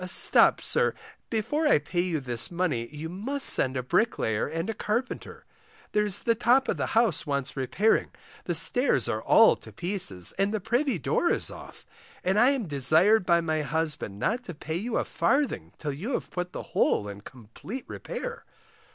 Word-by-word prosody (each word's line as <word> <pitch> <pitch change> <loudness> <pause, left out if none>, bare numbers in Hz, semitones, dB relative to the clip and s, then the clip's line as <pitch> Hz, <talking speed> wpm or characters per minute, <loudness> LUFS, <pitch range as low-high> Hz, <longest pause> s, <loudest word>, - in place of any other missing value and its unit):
Stop, - - +4
sir, 475 0 +1 0.3
before 295 +8 0
I - - +5
pay 175 +4 -2
you 175 -3 -1
this 125 -4 -3
money, 170 -10 -1
you 150 +3 -7
must 240 +11 -2
send 130 0 +4
a 125 - -2
bricklayer 125 - 0
and 165 +3 -4
a 225 - -2
carpenter; 225 +4 -4 0.5
there's 210 -2 0
the 230 - +2
top 245 +4 +3
of - - -1
the - - -1
house 225 -11 +2
wants 140 -2 -2
repairing, 180 - +1 0.4
the 175 - 0
stairs 245 - +3
are - - -2
all - - +6
to - - -13
pieces, 175 - -1
and 195 +1 +2
the 215 - -1
privy 240 +3 0
door 340 - 0
is - - 0
off, - - -12 0.4
and 190 +3 +2
I 245 +4 +6
am 270 -6 -1
desired 160 - +3
by 170 -1 +4
my 155 -2 -1
husband 150 -8 -3
not 235 - -1
to 175 - -7
pay 160 +2 -4
you 220 +5 -2
a - - 0
farthing 285 0 0
till 145 -3 -4
you 200 - -5
have - - -3
put 180 0 -4
the - - -6
whole 105 - +2
in 100 0 -8
complete 130 - -9
repair. 480 -1 -6
180 Hz, 185 wpm, -27 LUFS, 150-230 Hz, 0.5 s, all